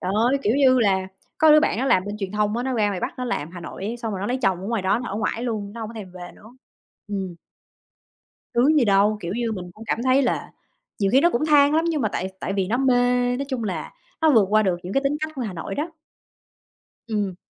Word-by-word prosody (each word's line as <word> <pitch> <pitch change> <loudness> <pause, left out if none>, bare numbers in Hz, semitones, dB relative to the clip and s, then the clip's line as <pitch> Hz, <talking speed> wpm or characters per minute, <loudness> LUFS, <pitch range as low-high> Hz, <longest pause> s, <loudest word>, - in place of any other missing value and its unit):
Trời 185 - -2 0.2
ơi, 280 - +2
kiểu 215 - +2
như 260 -2 +5
là, 190 -4 +2 0.3
có 315 0 +6
đứa 305 - +7
bạn 235 - 0
nó 260 - 0
làm 185 -8 +3
bên 205 +1 -5
truyền 195 -2 -4
thông 210 +1 0
á, 240 - -1
nó 260 +1 -2
ra 215 -3 +2
ngoài 195 -3 -3
Bắc - - -4
nó 250 - -2
làm, 200 -11 -3
Hà 175 0 -9
Nội 170 - -8
ấy, 225 +4 -3
xong 230 -2 -4
rồi 190 - -4
nó 200 - -2
lấy 250 +3 -1
chồng 190 -3 +1
ở - - -5
ngoài 230 -4 -1
đó 190 +4 +2
nó 245 - -5
ở 195 - -4
ngoải 225 +2 -2
luôn, 215 -4 -3
nó 230 - -8
hông 220 -1 -5
có - - -11
thèm 200 -5 -8
về 180 -1 -9
nữa. 230 +5 -17 0.5
Ừm. 190 -3 -4 1.2
Sướng 280 +6 +4
gì 260 - +4
đâu, 205 +1 +3
kiểu 170 +1 -4
như 235 0 -1
mình 180 -4 -6
cũng 220 +3 -12
cảm 225 - -1
thấy 260 +1 +4
là 250 - -1 0.5
nhiều 195 -2 +1
khi 265 - +5
nó 345 - +5
cũng 245 +6 0
than 290 -1 +5
lắm, 325 +1 +2
nhưng 310 -4 -1
mà 215 - +1
tại 185 - -3
tại 195 - -3
vì 195 -2 0
nó 235 - 0
mê 245 -1 +2
nói 280 - -3
chung 255 -4 -2
là 195 -4 -4 0.3
nó 320 - +5
vượt 220 -6 +5
qua 215 +1 +4
được 185 -3 +1
những 180 +2 -5
cái 275 - +1
tính 280 +2 0
cách 310 0 -3
của 265 - -4
Hà 215 -6 -4
Nội 165 - -5
đó. 310 +4 -3 1.2
Ừm. 205 -4 -2
225 Hz, 280 wpm, -23 LUFS, 195-255 Hz, 1.2 s, đứa